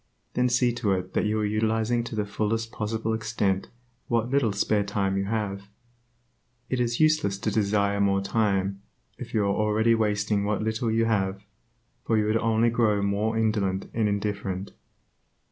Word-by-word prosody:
Then 125 0 +2
see 125 0 +2
to 110 -5 0
it 95 0 -3
that - - +1
you 110 +1 0
are - - +1
utilizing 110 +2 +1
to 120 - -6
the 105 -1 -1
fullest 110 +2 -2
possible 110 +1 -2
extent 105 -3 -1 0.4
what 115 +1 0
little 135 -6 +2
spare 100 +1 +1
time 100 -1 -1
you 95 0 0
have. 100 -2 -3 1.0
It 130 - 0
is 120 -1 0
useless 155 -11 +3
to 105 +1 -2
desire 100 -1 +1
more 100 -1 +3
time, 100 -2 0 0.4
if 120 -2 -7
you 105 - +3
are 100 0 +1
already 110 +2 +2
wasting 105 -2 +1
what 105 +1 -1
little 110 +1 -1
you 115 +1 +2
have; 100 -3 0 0.6
for 115 - +1
you 105 - +2
would 110 +1 +2
only 115 +1 +2
grow 110 -3 +2
more 105 +3 0
indolent 105 -4 0
and 110 -2 +1
indifferent. 100 -2 -3
105 Hz, 170 wpm, -26 LUFS, 100-115 Hz, 1.0 s, useless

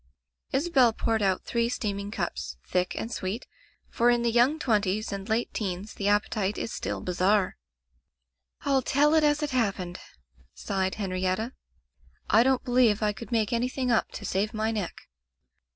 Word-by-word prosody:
Isabel 270 -5 +3
poured 225 0 0
out 190 -2 +1
three 235 0 0
steaming 200 -4 -3
cups, 215 - -4
thick 180 0 0
and 230 - -4
sweet, 200 +2 -3 0.4
for 240 +1 +2
in 240 -1 +3
the 235 - +2
young 245 +6 +4
twenties 215 -6 0
and 200 +2 -5
late 225 +2 0
teens 195 0 -3
the 200 - -3
appetite 205 0 +1
is 225 - -4
still - - -3
bizarre. 185 +2 +1 1.1
"rU 275 -2 +3
tell 290 +4 +3
it 315 -1 +4
as 295 0 +2
it 295 - -2
happened," 195 -8 -1 0.6
sighed 190 -1 -1
Hen 200 -3 -3
rietta. 185 +6 -1 0.8
"I 220 - +7
don't 260 +1 +2
believe 245 -4 +3
I 210 0 +2
could 230 +3 -10
make 225 -1 +1
any 240 +2 +1
thing 255 -1 -1
up 230 - +2
to - - -7
save 210 +4 -1
my 220 +1 0
neck." 205 -6 -4
220 Hz, 170 wpm, -27 LUFS, 200-245 Hz, 1.1 s, I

